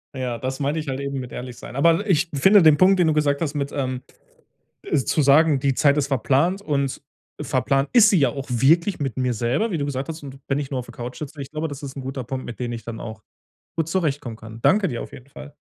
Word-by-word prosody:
Ja, 125 -2 -3
das 130 +3 -4
meinte 145 +3 -1
ich 150 - -6
halt 130 +1 -3
eben 140 -1 -3
mit 125 -1 -7
ehrlich 125 -1 -7
sein. 120 - -10
Aber 170 +8 +3
ich 175 -1 +2
finde 190 +8 +6
den 155 -2 +6
Punkt, 190 0 +5
den 170 - +4
du 155 - +3
gesagt 145 0 +1
hast 150 -2 -2
mit 140 0 -2
ähm, 130 -2 -3 0.8
äh, - - 0
zu 150 +3 +1
sagen, 145 +1 +5
die 140 -1 +2
Zeit 140 +2 +3
ist 140 -1 0
verplant 140 - +1
und 140 -7 -2 0.4
verplant 135 +1 0
ist 220 -3 +7
sie 190 - +4
ja 135 -3 +4
auch 135 +2 -5
wirklich 165 - +3
mit 135 -6 -3
mir 125 -1 0
selber, 120 - 0
wie 170 - -2
du 140 - -1
gesagt 135 +2 -3
hast 160 -1 -7
und 135 -1 -9
wenn 135 +1 +1
ich 140 -1 -4
nur 130 -2 -2
auf - - -8
der 120 - -11
Couch 120 +1 -7
sitze, 150 -1 -7
ich 135 - -7
glaube, 155 +1 -3
das 145 +1 -8
ist 140 0 -7
'n 135 - -5
guter 135 0 -5
Punkt, 130 +2 -5
mit 120 - -8
dem 120 -1 -2
ich 115 -1 -7
dann 115 -1 -7
auch 110 -1 -8 0.5
gut 165 -1 -1
zurechtkommen 145 -10 -2
kann. 110 +1 -11
Danke 200 -2 +3
dir 120 -3 -4
auf - - -11
jeden 125 - -12
Fall. 145 +1 -12
140 Hz, 265 wpm, -23 LUFS, 130-155 Hz, 0.8 s, ist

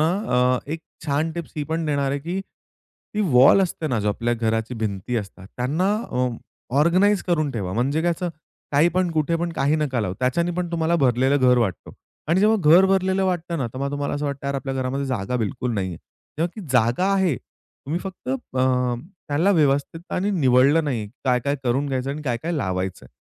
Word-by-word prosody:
ना 155 - +4 0.3
अ, 125 0 +3
एक 165 - -4 0.3
छान 150 +3 0
टिप्स 170 -1 -6
ही 150 - -1
पण 165 +1 -1
देणार 140 -2 0
आहे, 140 - -1
की 175 +6 -3 0.7
ती 210 - 0 0.2
वॉल 135 +9 +7
असते 170 -3 -2
ना 125 -4 0
जो 105 - 0
आपल्या 115 +3 0
घराची 115 +1 -1
भिंती 100 +4 -3
असतात 100 -3 -6
त्यांना 155 +10 0 0.2
अ, 125 0 +1 0.5
ऑर्गनाइज 190 +5 +3
करून 155 -5 +1
ठेवा 100 -7 -3
म्हणजे 135 +9 0
काय 175 - +2
असं 180 - -2 0.4
काही 145 +4 +5
पण 185 -1 +1
कुठे 160 +1 0
पण 170 0 -2
काही 145 0 +1
नका 140 -6 0
लावू 95 -4 -2
त्याच्याने 170 +7 +1
पण 180 -1 -2
तुम्हाला 165 0 +1
भरलेलं 130 -1 +3
घर 125 0 +5
वाटतो 100 -8 -2 0.4
आणि 170 +4 +3
जेव्हा 215 +2 +4 0.2
घर 180 +3 +8
भरलेलं 190 0 +2
वाटतं 175 -2 -1
ना 130 - -1
तेव्हा 130 +4 -4
तुम्हाला 145 0 -2
असं 145 +1 -3
वाटतं 140 -1 -4
आपल्या 135 0 -3
घरामध्ये 135 +1 -2
जागा 125 -1 -2
बिलकुल 120 +2 -2
नाहीये. 95 -4 -2 0.4
तेव्हा 165 - +1
ती 210 - -7
जागा 125 +8 +3
आहे 185 -9 +2
तुम्ही 150 +9 -8
फक्त 190 -8 -8
अ, 130 -1 0 0.3
त्याला 155 +7 +2
व्यवस्थित 145 -1 +1
आणि 200 +3 0
निवडलं 140 -1 +4
नाहीये 120 -8 -2 0.2
काय-काय 130 +3 +1
करून 130 +4 +1
घ्यायचं 135 0 -2
आणि 150 +2 -5
काय-काय 130 +5 -2
लावायचंय. 95 -6 -3
140 Hz, 190 wpm, -23 LUFS, 125-165 Hz, 0.7 s, घर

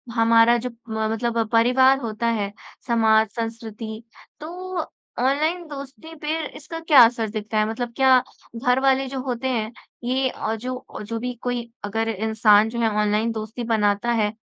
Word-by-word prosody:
हमारा 230 +1 +5
जो 250 +2 -4 0.2
म 220 0 -1
मतलब 230 0 -1
परिवार 255 +4 +4
होता 230 -2 -3
है 210 -3 -1 0.4
समाज, 220 -2 +4
संस्कृति 225 -1 -6 0.4
तो 360 +3 -6 0.4
ऑनलाइन 305 +7 +1
दोस्ती 290 +3 -9
पे 305 +1 -1 0.2
इसका 325 +2 -8
क्या 305 -6 +7
असर 230 -1 -1
दिखता 215 0 -4
है? 215 - +3
मतलब 235 +1 -4
क्या 265 -1 +6 0.4
घर 250 +2 +2
वाले 270 0 +2
जो 265 0 -4
होते 255 -1 -3
हैं 225 -4 -1 0.3
ये 260 +1 0 0.3
जो 255 0 -7
जो 225 +2 -4
भी 250 +2 -3
कोई 245 -1 -3 0.2
अगर 225 +2 -1
इंसान 220 0 +3
जो 235 +1 -5
है 230 -1 +2
ऑनलाइन 210 +2 +1
दोस्ती 220 +2 -5
बनाता 215 0 +1
है 210 -2 +1
235 Hz, 160 wpm, -23 LUFS, 220-260 Hz, 0.4 s, क्या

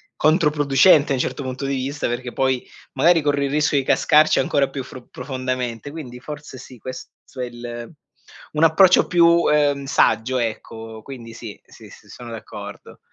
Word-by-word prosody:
controproducente, 150 -1 +4
un 130 - -1
certo 140 - -3
punto 130 +1 -5
di 135 0 -1
vista, 135 +2 -3
perché 120 +1 -4
poi 130 -1 0 0.3
magari 165 +5 +4
corri 145 -1 0
il 135 - -3
rischio 150 0 +1
di 135 - +1
cascarci 150 +3 +4
ancora 140 -2 +1
più 135 -1 -5
fro 125 -1 -12
profondamente. 130 -2 -4
Quindi 130 -6 -9
forse 150 0 -9
sì 125 0 -12
questo 130 +3 -8 0.3
è 125 - -1
il 120 -1 -8 0.6
un 155 +1 +1
approccio 180 +3 +5
più, 175 -1 +4
uhm, 150 -4 +2
saggio 125 -1 +2
ecco. 110 -1 -5
Quindi 115 -2 -10
sì, 115 -2 -9
sì, - - -15
sì - - -17
sono 120 -1 -10
d'accordo. 115 - -10
135 Hz, 165 wpm, -21 LUFS, 125-150 Hz, 0.6 s, approccio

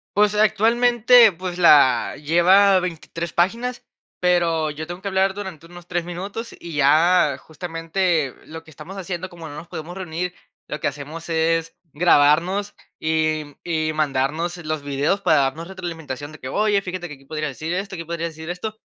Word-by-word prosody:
Pues 210 0 +4
actualmente, 235 +2 +5
pues 180 +1 -6
la 135 -8 +5
lleva 185 +5 +5
23 170 -1 -5
páginas, 235 +8 0 0.3
pero 170 -3 +2
yo 155 +2 -7
tengo 175 +1 -7
que 200 - -6
hablar 190 0 +1
durante 185 -5 -7
unos 175 0 -13
3 175 -1 -2
minutos, 195 +6 -6
y 170 -2 -8
ya 155 +1 +4
justamente 165 -2 -2
lo 160 +1 -9
que 160 - -16
estamos 170 +7 -10
haciendo, 185 -1 -5
como 170 -2 -10
no 145 - -9
nos 165 +3 -9
podemos 165 +3 -7
reunir, 180 -1 -4 0.3
lo 150 - -5
que - - -1
hacemos 150 +4 -7
es 165 0 0 0.2
grabarnos 170 +5 +3 0.3
y, 155 -1 0
mm, 145 - -15
y 155 -2 -1
mandarnos 155 +4 -1
los 155 -3 -4
videos 145 +8 0
para 155 -6 +4
darnos 155 +6 -2
retroalimentación 160 -6 -6
de 155 - -13
que: 130 - -7
"Oye, 205 +3 +2
fíjate 185 -2 -5
que 150 - -9
aquí 135 0 -16
podría 155 +1 -3
decir 155 +5 -5
esto, 195 +1 -4
aquí 165 - -6
podría 170 0 -4
decir 160 +1 -9
esto". 210 +5 -4
170 Hz, 175 wpm, -22 LUFS, 155-185 Hz, 0.3 s, actualmente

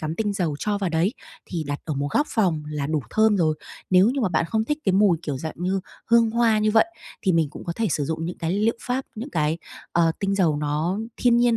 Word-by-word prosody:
cắm 155 0 -3
tinh 210 -2 0
dầu 170 -7 -1
cho 205 +3 -1
vào 195 -3 -1
đấy, 165 +7 +1 0.3
thì 170 -4 -3
đặt 145 0 -3
ở 155 - -3
một 140 +1 -1
góc 290 - +2
phòng 175 -9 +1
là 150 -2 -2
đủ 155 0 0
thơm 220 -1 +4
rồi. 155 -3 +2 0.4
Nếu 185 +2 +6
như 275 - -1
mà 220 - +2
bạn 165 -1 +1
không 220 +3 +1
thích 295 +6 -1
cái 190 - +3
mùi, 190 -4 +4
kiểu, 145 -5 -3
dạng 160 +3 -5
như 185 +3 -1 0.3
hương 230 -1 +4
hoa 230 -2 +3
như 215 0 +2
vậy, 220 +7 +5 0.4
thì 190 - +2
mình 165 -4 +2
cũng - - -10
có 170 - -2
thể 225 -2 +1
sử 145 -1 0
dụng 160 +2 -3
những 175 - -5
cái 165 - -2
liệu 215 +4 +1
pháp, 255 +2 -2
những 240 +7 -6
cái, 155 +1 0 0.3
ờ, 165 -1 +3
tinh 195 0 0
dầu 170 -7 +2
nó 150 +6 -1 0.2
thiên 240 -1 +4
nhiên 240 -1 +4
185 Hz, 260 wpm, -24 LUFS, 160-220 Hz, 0.4 s, Nếu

